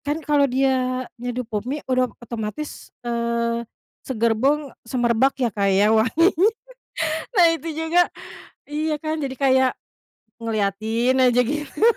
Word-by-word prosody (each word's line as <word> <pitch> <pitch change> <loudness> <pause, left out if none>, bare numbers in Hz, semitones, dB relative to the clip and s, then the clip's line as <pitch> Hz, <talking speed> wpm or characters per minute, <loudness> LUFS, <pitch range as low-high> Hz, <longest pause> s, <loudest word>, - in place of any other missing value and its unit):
kan 290 +1 -2
kalau 290 -2 +3
dia 255 -1 +1 0.2
nyeduh 245 +1 -3
Pop 220 +1 -4
Mie 290 +2 -4
udah 255 -1 +1
otomatis, 235 +5 -6 0.2
eee, 235 0 -1 0.5
segerbong 260 +4 +1 0.2
semerbak 245 +2 +2
ya 245 -4 0
Kak 200 -1 +1
ya 200 +3 +4
wanginya, 330 - +4 0.9
nah 350 -2 +7
itu 330 0 -6
juga 320 +3 +2 0.6
iya 305 +1 -1
kan? 310 0 -2
Jadi 265 -1 -3
kayak, 260 -2 +3 0.7
ngeliatin 225 +4 0
aja 250 -1 +4
gitu. 295 - -4
255 Hz, 125 wpm, -22 LUFS, 230-295 Hz, 0.9 s, nah